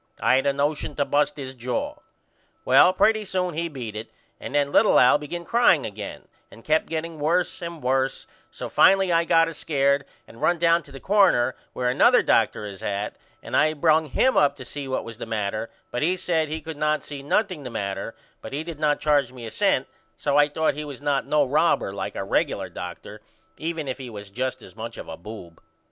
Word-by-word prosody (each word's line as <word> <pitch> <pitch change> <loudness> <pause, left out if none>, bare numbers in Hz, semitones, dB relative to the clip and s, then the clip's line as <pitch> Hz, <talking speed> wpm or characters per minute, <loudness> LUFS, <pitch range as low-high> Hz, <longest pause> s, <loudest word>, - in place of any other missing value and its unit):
I 130 - +4
had 135 - 0
a - - +4
nosion 145 +2 -1
to 145 - 0
bust 145 +2 +1
his 130 -2 -6
jaw. 130 - -3 0.7
Well 180 - +6
pretty 215 +3 +3
soon 185 -3 -2
he 170 +2 -2
beat 120 -8 -7
it 110 +1 -6 0.3
and - - -6
then 145 -1 +2
little 210 +6 +5
Al 125 +3 +6
begin 170 +4 -6
crying 230 - +4
again 105 -1 -7 0.2
and 115 - -15
kept 155 +1 +1
getting 160 0 -4
worse 170 +5 0
and 170 -3 -7
worse 130 +1 0 0.2
so - - -7
finally 195 -1 +4
I 165 0 +3
got 165 0 +4
a 165 - -5
scared 140 -2 +1 0.2
and 115 - -15
run 175 - +3
down 170 0 +3
to 145 - -17
the 135 - -9
corner 190 -12 +3 0.2
where 125 - -2
another 125 - +5
Dr. 105 - +2
is 100 -2 -8
at 100 +1 -3 0.3
and - - -4
I 155 +1 +4
brung 160 +1 +3
him 255 - +2
up 140 -1 +4
to 130 -3 -10
see 140 +1 -6
what 130 - -2
was 115 -2 -9
the - - -6
matter 110 +1 -2 0.2
but 125 - -2
he 180 +4 +1
said 165 -3 0
he 155 +1 -4
could 160 0 -7
not 155 0 0
see 145 -2 -7
nothing 185 +3 0
the 130 - -6
matter 100 0 -4 0.3
but 135 - -9
he 145 +3 -2
did 165 -2 -8
not 150 -1 +2
charge 145 -4 +2
me 125 -2 -9
a 110 - -7
cent - - +1 0.3
so 140 -1 -1
I 145 0 +6
thought 160 +2 0
he 150 - -5
was 145 -3 -8
not 145 -1 -1
no 150 -1 +3
robber 150 -5 +2
like 100 - -5
our 95 - -3
regular - - 0
doctor - - -8 0.4
even 160 -2 -3
if 130 +1 -4
he 130 -2 -7
was 105 -2 -9
just 130 +2 -3
as - - -14
much 115 +1 -7
of - - -8
a 80 - -6
boob. 85 -2 -11
145 Hz, 220 wpm, -24 LUFS, 125-165 Hz, 0.7 s, Well